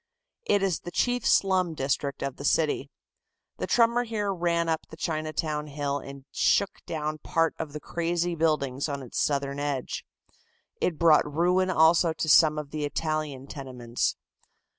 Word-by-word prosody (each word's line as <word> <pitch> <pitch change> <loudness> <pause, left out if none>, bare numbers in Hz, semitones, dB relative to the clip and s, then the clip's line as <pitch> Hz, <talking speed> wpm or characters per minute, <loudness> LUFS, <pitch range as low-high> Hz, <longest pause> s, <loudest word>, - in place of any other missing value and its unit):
It 200 -1 +3
is 190 -4 +1
the - - -8
chief 245 +5 0
slum 185 -4 +3
district 140 0 -2
of 140 -1 -4
the - - -8
city. 145 -1 +1 0.7
The - - -2
tremor 235 +1 +3
here 210 -4 -2
ran 170 -2 0
up 160 -1 -1
the 160 - -12
Chinatown 155 -2 -2
hill 145 -1 -2
and 140 0 -10
shook 200 - +1
down 155 -1 -3
part 165 +1 +1
of 160 -3 -4
the 150 - -6
crazy 170 +2 -1
buildings 150 -4 0
on 140 -1 -4
its 125 - -5
southern 140 -1 0
edge. 145 -3 -3 0.7
It 165 - -1
brought 155 -2 +4
ruin 180 +4 +2
also 165 -1 +4
to 160 - -3
some 155 0 +6
of 150 -1 -5
the 155 -1 -3
Italian 150 -2 -2
tenements. 125 -4 -3
155 Hz, 160 wpm, -27 LUFS, 140-170 Hz, 0.7 s, some